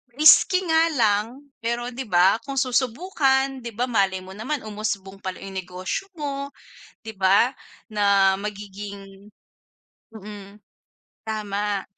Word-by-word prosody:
risky 365 +5 +7
nga 325 +1 +3
lang. 225 +4 +1 0.2
Pero 240 +1 -1
'di 260 +2 -5
ba 185 +4 +4
kung 275 -1 -6
susubukan, 265 +1 +1
'di 235 - -5
ba 240 - 0
malay 195 -4 +1
mo 190 - -11
naman 260 +7 -3
umusbong 205 -2 -4
pala 185 -1 -5
yung 195 -1 -7
negosyo 185 - -5
mo, 280 -1 -4 0.5
'di 220 - -7
ba? 195 +6 +4 0.4
Na 200 -2 +4
magiging 200 -1 -8 0.8
mm. 205 -1 -10 0.7
Tama. 205 -2 -2
210 Hz, 120 wpm, -24 LUFS, 195-260 Hz, 0.8 s, risky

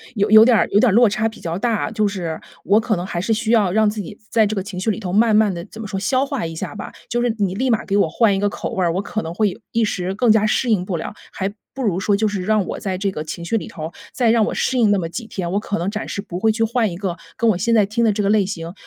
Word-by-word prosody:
有 205 -1 +1
有 220 0 +10
点 240 -1 +5
儿 - - +2
有 205 - +4
点 250 - +4
儿 - - 0
落 240 +1 +6
差 215 +2 0
比 220 - -14
较 165 0 -4
大。 220 0 -1
就 215 -1 +1
是， 175 -5 -4 0.2
我 205 +3 +4
可 220 -1 0
能 175 0 -4
还 175 -2 -3
是 225 +4 0
需 220 0 -1
要 210 -6 +3
让 215 +2 +3
自 210 0 -5
己 200 +2 -9 0.2
在 230 - +3
在 215 - +5
这 215 - -3
个 195 - -1
情 190 -2 -7
绪 205 - -1
里 215 - -4
头 185 -4 -4
慢 220 +1 +4
慢 215 -2 +4
地 170 -1 -6
怎 220 - -11
么 210 - -5
说？ 195 -2 -3
消 255 +7 +1
化 275 - -3
一 165 0 -5
下 - - -5
吧， 210 - -7 0.2
就 240 0 0
是 240 -2 +1
你 195 -3 0
立 255 +7 -1
马 225 -2 +1
给 195 - -1
我 200 - +3
换 210 +2 +3
一 - - -1
个 205 0 +1
口 - - -5
味 185 - 0
儿， 170 - +2
我 185 - -1
可 215 +2 -3
能 165 -3 -6
会 210 +2 +2
有 - - -9
一 230 - +1
时 185 -2 -2
更 230 +1 +3
加 215 -1 +4
适 235 +3 +1
应 195 -5 +2
不 180 -3 -2
了， 160 - -5 0.2
还 195 +1 -3 0.2
不 270 - -6
如 190 -5 0
说 205 +1 +2
就 220 - +1
是 205 -3 -2
让 215 -1 +1
我 - - -5
在 190 -2 -3
这 195 +1 -1
个 155 -4 -5
情 170 +2 -7
绪 225 +6 0
里 - - -5
头， 160 -1 -7 0.2
再 235 -3 +2
让 230 -2 +4
我 - - -2
适 260 - 0
应 220 - +4
那 205 - +3
么 165 - -2
几 220 +7 -6
天， 180 -5 -4
我 200 - +1
可 210 -1 -3
能 175 - -1
暂时 215 -2 -4
不 180 -3 -6
会 220 +2 +3
去 225 +1 0
换 225 -3 +1
一 170 - -6
个 185 -3 -3 0.2
跟 230 -1 +3
我 190 - -1
现 230 +6 0
在 210 -3 +5
听 225 +3 -1
的 225 - +4
这 210 - -1
个 200 - +1
类 210 -2 +3
型， 170 -4 -5
210 Hz, 365 characters per minute, -20 LUFS, 185-225 Hz, 0.2 s, 有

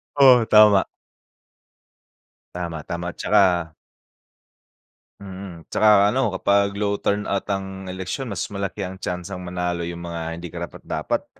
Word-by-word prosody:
Oo, 130 -4 +7
tama. 105 -3 +6 1.7
Tama, 85 -3 -5
tama 85 0 -4
'tsaka 90 -6 +2 1.5
mm, 95 -4 -9
'tsaka 105 -1 +5
ano 130 -3 +1
kapag 100 +1 +1
low 100 0 0
turn 105 +1 0
out 100 +1 -2
ang 95 -1 -4
eleksyon 95 +8 -4
mas 100 - -3
malaki 100 0 -3
ang 95 +1 -8
tyansang 90 0 -5
manalo 90 -1 -3
yung 85 0 -5
mga 85 -1 -5
hindi 85 +1 -7
karapat-dapat. 85 0 -4
95 Hz, 120 wpm, -22 LUFS, 85-100 Hz, 1.7 s, Oo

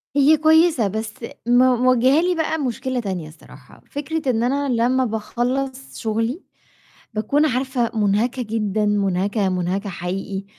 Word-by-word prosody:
هي 290 +2 +5
كويسة 315 -5 +4
بس 220 +2 -4 0.3
م - - +1
مواجهالي 255 +7 +3
بقى 320 -1 -1
مشكلة 260 -2 -2
تانية 190 -8 -4
الصراحة، 155 - -17
فكرة 295 0 -3
إن 225 -1 0
أنا 280 +3 0
لمّا 250 +2 +2
باخلّص 255 +4 -3
شغلي 225 - -2 0.7
باكون 250 +8 +1
عارفة 255 -3 0
منهكة 215 +5 +1
جدًا 215 -2 -1
منهكة، 200 0 0
منهكة 185 +3 -2
حقيقي، 190 +2 -4
240 Hz, 125 wpm, -21 LUFS, 210-270 Hz, 0.7 s, هي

